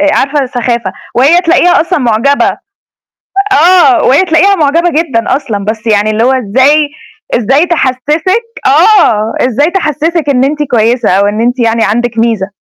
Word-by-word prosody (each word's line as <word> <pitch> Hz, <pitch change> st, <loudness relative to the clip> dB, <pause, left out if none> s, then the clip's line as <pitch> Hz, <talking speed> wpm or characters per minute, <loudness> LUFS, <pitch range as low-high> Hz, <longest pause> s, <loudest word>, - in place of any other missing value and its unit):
آآ، 300 Hz, 0 st, +2 dB
عارفة 280 Hz, 0 st, -1 dB
سخافة، 240 Hz, -5 st, -3 dB, 0.2 s
وهي 290 Hz, +8 st, +3 dB
تلاقيها 350 Hz, 0 st, +2 dB
أصلًا 335 Hz, +2 st, -1 dB
معجبة، 245 Hz, +2 st, 0 dB, 0.9 s
آه، 360 Hz, 0 st, +3 dB
وهي 275 Hz, +8 st, +3 dB
تلاقيها 350 Hz, +3 st, +2 dB
معجبة 330 Hz, +2 st, +1 dB
جدًا 275 Hz, -7 st, -1 dB
أصلًا، 210 Hz, -8 st, -5 dB
بس 215 Hz, +2 st, -5 dB
يعني 210 Hz, -1 st, +1 dB
اللي 215 Hz, +2 st, 0 dB
هو 260 Hz, -, +2 dB
إزاي 265 Hz, +5 st, +1 dB, 0.5 s
إزاي 270 Hz, +8 st, +1 dB
تحسسِك 315 Hz, -, -1 dB, 0.2 s
آه 225 Hz, -, +2 dB
إزاي 285 Hz, +6 st, 0 dB
تحسسِك 325 Hz, -2 st, -2 dB
إن 265 Hz, -2 st, +1 dB
أنتِ 295 Hz, +2 st, -2 dB
كويسة 235 Hz, +1 st, +1 dB
أو 195 Hz, +2 st, +1 dB
إن 210 Hz, +2 st, -2 dB
أنتِ 245 Hz, +2 st, -1 dB
يعني 230 Hz, -1 st, 0 dB
عندِك 230 Hz, +2 st, -2 dB
ميزة. 225 Hz, -4 st, 0 dB
265 Hz, 150 wpm, -9 LUFS, 230-320 Hz, 0.9 s, وهي